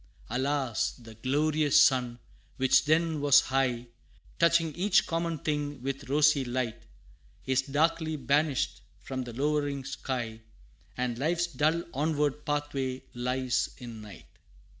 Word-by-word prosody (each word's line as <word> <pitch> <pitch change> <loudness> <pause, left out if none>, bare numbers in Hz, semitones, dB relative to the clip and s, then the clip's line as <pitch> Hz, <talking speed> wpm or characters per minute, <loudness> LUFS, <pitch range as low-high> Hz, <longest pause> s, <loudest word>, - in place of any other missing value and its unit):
Alas! 135 -2 0
the 115 -2 -13
glorious 145 +5 +2
sun, 125 -3 +3 0.4
which 130 +2 +4
then 160 0 +2
was 145 0 +7
high, 125 -2 0 0.5
Touching 170 -1 +3
each 195 +4 +3
common 165 -1 -2
thing 145 -1 -3
with 135 0 -4
rosy 150 0 +4
light, 120 -2 -3 0.6
Is 130 0 +2
darkly 160 +3 0
banished 140 - 0 0.2
from 130 +6 -5
the 120 - -8
lowering 145 0 -1
sky 120 -5 -4 0.6
And 125 -1 -2
life's 170 +4 +1
dull 160 +1 0
onward 150 0 -1
pathway 140 -3 -2
lies, 125 +1 -1
in 120 -3 -9
night. 105 -2 -12
140 Hz, 120 wpm, -29 LUFS, 130-150 Hz, 0.6 s, was